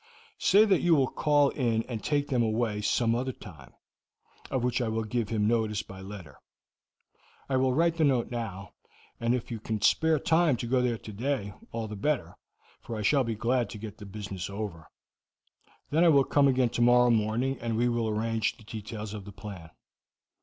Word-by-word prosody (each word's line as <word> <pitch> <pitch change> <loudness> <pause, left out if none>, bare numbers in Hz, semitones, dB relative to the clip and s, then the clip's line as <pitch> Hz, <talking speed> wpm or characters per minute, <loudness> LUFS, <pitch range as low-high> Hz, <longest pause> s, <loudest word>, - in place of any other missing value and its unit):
Say 210 +2 +5
that 195 -4 +3
you 175 -2 +4
will 135 -3 +3
call 145 -2 +3
in 115 -4 0
and 115 -3 -6
take 145 -1 0
them 125 -4 +2
away 110 -1 0
some 115 +2 +1
other 130 +3 -1
time, 100 -9 -13 0.8
of 130 -3 -1
which 125 0 0
I 120 - 0
will 110 0 -1
give 110 0 -2
him 105 -2 +1
notice 110 -2 0
by 95 -2 -11
letter. 95 -8 -10 1.1
I 135 - +1
will 130 0 +2
write 165 +4 +2
the 160 - +2
note 130 -4 +2
now, 100 -5 -5 0.5
and 115 +1 +1
if 125 -1 -5
you 115 - -4
can 110 0 -3
spare 160 +9 +3
time 160 -3 +2
to 120 - -4
go 125 +2 +2
there 120 -2 0
today, 110 0 -3 0.2
all 115 -1 -3
the 105 - -6
better, 140 +7 -1 0.5
for 115 - -6
I 105 - -3
shall 135 +6 +3
be 115 -2 -2
glad 120 +2 0
to - - -8
get 105 -1 -8
the 105 - -9
business 100 -2 -6
over; 100 -6 -6 1.0
then 160 +3 +3
I 175 - +6
will 140 -3 +5
come 140 +1 +3
again 130 -2 +2
tomorrow 120 +1 +4
morning, 115 +4 0
and 115 -1 -2
we 120 +1 +2
will 120 -2 0
arrange 110 0 -1
the - - -16
details 110 -1 -7
of 105 -2 -7
the 100 - -9
plan. 95 -5 -9
115 Hz, 195 wpm, -28 LUFS, 105-130 Hz, 1.1 s, I